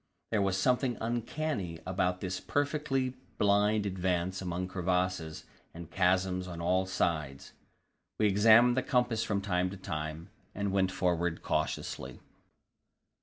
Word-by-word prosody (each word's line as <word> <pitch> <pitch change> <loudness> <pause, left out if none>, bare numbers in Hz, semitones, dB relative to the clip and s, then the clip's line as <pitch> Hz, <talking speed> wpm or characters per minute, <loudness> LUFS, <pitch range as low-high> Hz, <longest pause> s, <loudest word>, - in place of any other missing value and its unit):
There 110 -2 +2
was 95 -1 +1
something 125 +3 +1
uncanny 115 - -2
about 90 -1 0
this 95 -1 -3
perfectly 145 -3 -1 0.2
blind 105 +1 +3
advance 95 -1 -1
among 90 0 -3
crevasses 90 -3 -1 0.3
and 85 0 -9
chasms 90 0 +1
on 85 -2 -7
all 95 +2 +1
sides. 80 -7 -2 0.6
We 110 - +2
examined 110 +4 +6
the 130 - +2
compass 120 -4 +1
from 100 -3 -1
time 90 -2 0
to 100 - -8
time, 80 0 -5 0.2
and 100 -1 -1
went 95 -1 +2
forward 85 -2 0
cautiously. - - -2
95 Hz, 125 wpm, -31 LUFS, 90-110 Hz, 0.6 s, examined